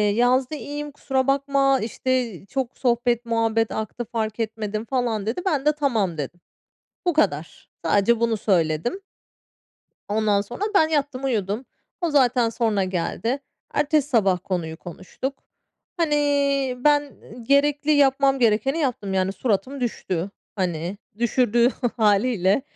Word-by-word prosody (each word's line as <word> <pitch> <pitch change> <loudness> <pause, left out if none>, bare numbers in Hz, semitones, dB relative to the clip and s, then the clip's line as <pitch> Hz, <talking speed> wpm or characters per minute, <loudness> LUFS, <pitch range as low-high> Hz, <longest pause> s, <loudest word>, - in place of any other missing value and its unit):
yazdı, 250 +4 +2
"İyiyim 295 0 -6
kusura 270 -2 -1
bakma, 275 -1 +2
işte, 235 -3 -2
çok 250 +5 -3
sohbet 240 -1 +1
muhabbet 225 -1 +1
aktı 220 +2 -4
fark 220 -1 -3
etmedim" 215 -1 -3
falan 235 -5 -1
dedi. 230 +11 -2
Ben 295 -7 0
de 300 - +6
"Tamam" 225 - 0
dedim. 150 +5 -5 0.7
Bu 350 - +2
kadar. 170 - -1 0.2
Sadece 205 +7 +3
bunu 230 -2 +1
söyledim. 180 - 0 1.1
Ondan 210 -1 +2
sonra 240 - -9
ben 315 -5 +5
yattım, 285 -4 -1
uyudum. 220 -1 -1 0.4
O 345 - +1
zaten 250 -5 +3
sonra 220 -4 0
geldi. 185 +8 -2 0.3
Ertesi 295 -1 +1
sabah 195 -9 +3
konuyu 165 -4 -3
konuştuk. 185 - -7 0.5
Hani, 320 -3 +2 0.7
ben 290 -1 +3 0.3
gerekli, 290 +3 +2
yapmam 275 -1 +4
gerekeni 245 +7 +2
yaptım. 235 -9 -1
Yani, 190 0 +1
suratım 240 +6 -1
düştü. 190 -6 -2 0.3
Hani, 180 0 -2 0.2
düşürdüğü 240 0 +3 0.3
hâliyle, 210 0 +3
235 Hz, 125 wpm, -23 LUFS, 205-275 Hz, 1.1 s, de